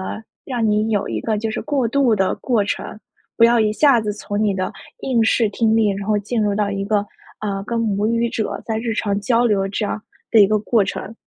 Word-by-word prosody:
呃， 220 Hz, -, -6 dB, 0.2 s
让 240 Hz, -4 st, -1 dB
你 210 Hz, +1 st, +1 dB
有 205 Hz, -2 st, 0 dB
一 -, -, -3 dB
个 220 Hz, -2 st, -1 dB
就 220 Hz, +1 st, -2 dB
是 -, -, -3 dB
过 280 Hz, -5 st, 0 dB
渡 255 Hz, -2 st, +3 dB
的 190 Hz, -2 st, +1 dB
过 230 Hz, -5 st, 0 dB
程， 210 Hz, -, -4 dB, 0.4 s
不 230 Hz, -, +6 dB
要 235 Hz, 0 st, +5 dB
一 215 Hz, -1 st, +2 dB
下 275 Hz, 0 st, +4 dB
子 210 Hz, -1 st, -2 dB
从 205 Hz, 0 st, -3 dB
你 205 Hz, -2 st, +1 dB
的 185 Hz, -1 st, -2 dB, 0.3 s
应 245 Hz, -, +1 dB
试 220 Hz, 0 st, +2 dB
听 220 Hz, +1 st, +1 dB
力 220 Hz, -2 st, +3 dB
然 195 Hz, 0 st, -4 dB
后 210 Hz, -, +2 dB
进 220 Hz, +2 st, -2 dB
入 205 Hz, -1 st, +1 dB
到 205 Hz, 0 st, 0 dB
一 195 Hz, 0 st, -3 dB
个， 205 Hz, 0 st, 0 dB, 0.3 s
呃， 200 Hz, -2 st, -3 dB
跟 235 Hz, +2 st, -2 dB
母 210 Hz, -2 st, 0 dB
语 230 Hz, +1 st, +1 dB
者 220 Hz, -2 st, -3 dB
在 220 Hz, -1 st, -1 dB
日 230 Hz, 0 st, -2 dB
常 200 Hz, -2 st, -1 dB
交 235 Hz, +2 st, +2 dB
流 195 Hz, -3 st, +1 dB
这 205 Hz, +2 st, -2 dB
样 215 Hz, -, -3 dB, 0.3 s
的 225 Hz, -, +6 dB
一 200 Hz, -, +8 dB
个 215 Hz, +1 st, +2 dB
过 215 Hz, 0 st, +2 dB
程。 205 Hz, +3 st, -5 dB
215 Hz, 260 characters per minute, -20 LUFS, 205-230 Hz, 0.4 s, 一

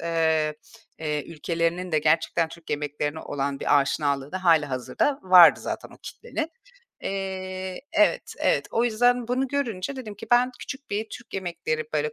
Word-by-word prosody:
eee, 160 Hz, -2 st, +1 dB, 0.4 s
eee, 150 Hz, -2 st, -2 dB
ülkelerinin 170 Hz, +2 st, -2 dB
de 155 Hz, -, +4 dB
gerçekten 165 Hz, +2 st, +2 dB
Türk 170 Hz, 0 st, -12 dB
yemeklerine 150 Hz, +1 st, -2 dB
olan 140 Hz, -1 st, -3 dB
bir 145 Hz, -, +4 dB
aşinalığı 140 Hz, +1 st, -1 dB
da 185 Hz, 0 st, -4 dB
hâlihazırda 155 Hz, -, +2 dB
vardı 180 Hz, -3 st, +8 dB
zaten -, -, -5 dB
o -, -, -14 dB
kitlenin. 320 Hz, 0 st, -5 dB, 0.5 s
Eee, 190 Hz, -1 st, -4 dB
evet, 315 Hz, -1 st, +2 dB
evet. -, -, +2 dB
O 230 Hz, +1 st, +1 dB
yüzden 245 Hz, +1 st, +2 dB
bunu 260 Hz, +1 st, 0 dB
görünce 265 Hz, -3 st, -2 dB
dedim 215 Hz, -5 st, -7 dB
ki 215 Hz, +3 st, -10 dB
ben 245 Hz, +1 st, +5 dB
küçük 280 Hz, 0 st, -8 dB
bir 215 Hz, +2 st, -1 dB
Türk 240 Hz, -1 st, -10 dB
yemekleri 170 Hz, -4 st, -2 dB
böyle 150 Hz, 0 st, 0 dB
175 Hz, 155 wpm, -25 LUFS, 155-225 Hz, 0.5 s, vardı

